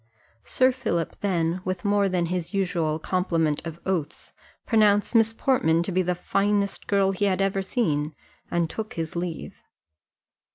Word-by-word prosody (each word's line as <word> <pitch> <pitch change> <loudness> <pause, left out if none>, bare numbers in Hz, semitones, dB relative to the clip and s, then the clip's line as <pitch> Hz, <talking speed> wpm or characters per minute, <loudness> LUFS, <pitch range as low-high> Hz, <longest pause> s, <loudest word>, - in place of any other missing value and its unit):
Sir 260 0 +3
Philip 170 -10 -2
then, 175 -3 0
with 185 -1 -4
more 200 -1 +3
than 180 -2 0
his 180 +2 -3
usual 170 -5 0
complement 165 -3 0
of 165 0 -7
oaths, 175 -6 -3 0.3
pronounced 210 -2 +3
Miss 225 -1 +4
Portman 200 - +2
to 190 - -3
be 185 +1 +2
the 180 0 0
finest 200 +2 0
girl 195 -1 +3
he 200 +1 -1
had 190 -2 +1
ever 195 0 +1
seen, 155 - -1 0.3
and 170 -1 +1
took 215 +6 -6
his 165 -1 -4
leave. 170 -1 -5
185 Hz, 155 wpm, -25 LUFS, 165-200 Hz, 0.3 s, Miss